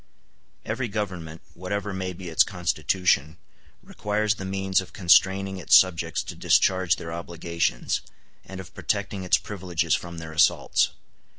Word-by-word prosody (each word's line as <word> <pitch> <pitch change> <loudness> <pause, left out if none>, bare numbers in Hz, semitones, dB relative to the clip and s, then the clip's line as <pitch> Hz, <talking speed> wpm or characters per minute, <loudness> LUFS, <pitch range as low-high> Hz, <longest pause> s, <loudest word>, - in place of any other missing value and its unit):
Every 120 +3 -2
government, 90 -6 -5
whatever 100 +3 -4
may 95 -1 -3
be 90 0 -8
its 80 - +3
constitution, 85 -3 +1 0.5
requires 105 0 -1
the 95 -2 -8
means 95 -1 0
of 90 -2 -13
constraining 95 +2 +3
its 90 - +4
subjects 85 -3 +3
to - - -8
discharge 95 -1 +3
their 80 0 -7
obligations, 85 -5 -2 0.4
and 95 0 -9
of 90 -3 -10
protecting 100 -2 -2
its 90 - +4
privileges 90 -5 -2
from 85 -1 -3
their 80 -1 -7
assaults. 80 -1 +3
95 Hz, 135 wpm, -25 LUFS, 85-95 Hz, 0.5 s, its